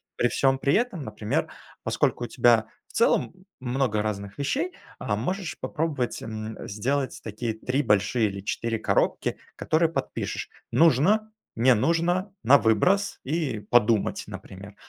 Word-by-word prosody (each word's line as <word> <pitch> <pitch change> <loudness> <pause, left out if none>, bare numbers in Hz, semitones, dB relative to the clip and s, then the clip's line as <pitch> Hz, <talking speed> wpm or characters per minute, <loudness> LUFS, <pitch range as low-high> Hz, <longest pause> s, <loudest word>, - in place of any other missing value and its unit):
При 120 - +2
всём 135 +1 +2
при 140 +1 +2
этом, 225 - 0
например, 105 -2 -2 0.4
поскольку - - 0
у - - -6
тебя 120 -3 +4 0.2
в - - -21
целом, 120 - +2 0.3
много 125 -4 0
разных 100 -2 -4
вещей, 290 - -1 0.3
а, - - -1
можешь 185 -1 -3
попробовать, 150 -6 -2
м, 110 0 -6
сделать 130 +6 -2
такие 110 +1 -3
3 125 +5 -1
большие, 105 +1 +2
или 100 -1 -5
4 115 +3 -2
коробки, - - 0 0.2
которые 160 +1 +1
подпишешь: 165 - -4 0.2
"нужно", 175 - +4 0.2
"не 125 +3 +5
нужно", 170 - +1
"на 135 +5 +7
выброс" 180 - +2
и 140 -5 -1
"подумать", 115 -3 +3
например. 100 +2 -10
125 Hz, 135 wpm, -26 LUFS, 110-160 Hz, 0.4 s, на